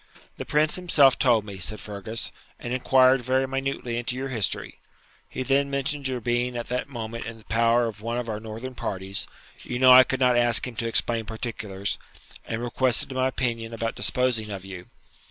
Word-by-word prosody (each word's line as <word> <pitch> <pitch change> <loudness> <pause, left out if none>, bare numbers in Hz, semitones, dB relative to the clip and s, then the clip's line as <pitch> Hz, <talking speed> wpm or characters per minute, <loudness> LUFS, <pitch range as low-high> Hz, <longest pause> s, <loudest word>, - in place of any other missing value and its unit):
'The - - -5
Prince 150 +2 +1
himself 150 -7 +4
told 115 -5 +3
me,' 100 -2 -8
said 100 +4 -2
Fergus, 105 +2 -5 0.3
'and 120 - -4
inquired 130 0 +4
very 130 +2 +1
minutely 135 -3 -3
into 120 +1 -3
your 135 +1 -4
history. 115 -6 -3 0.5
He 130 - -4
then 140 +1 +2
mentioned 140 0 -1
your 130 -1 -2
being 120 +1 -1
at 120 - -5
that 125 +2 -2
moment 115 -2 -6
in 115 -1 -7
the 110 - -17
power 115 +1 +3
of 110 -2 -6
one 115 +2 -3
of 125 -1 -3
our 105 -2 -3
northern 115 +4 -7
parties 95 -4 -4 0.3
you 125 - -4
know 130 0 +6
I 130 +1 +10
could 130 0 -3
not 125 -1 +4
ask 120 -1 +3
him 125 -2 -7
to 115 - -1
explain 115 0 0
particulars 105 -3 -4 0.5
and 115 +1 -4
requested 125 +1 +3
my 130 0 +1
opinion 115 -3 -2
about 115 0 -2
disposing 125 -4 0
of 95 -2 -6
you. 95 -2 -9
120 Hz, 190 wpm, -25 LUFS, 110-130 Hz, 0.5 s, I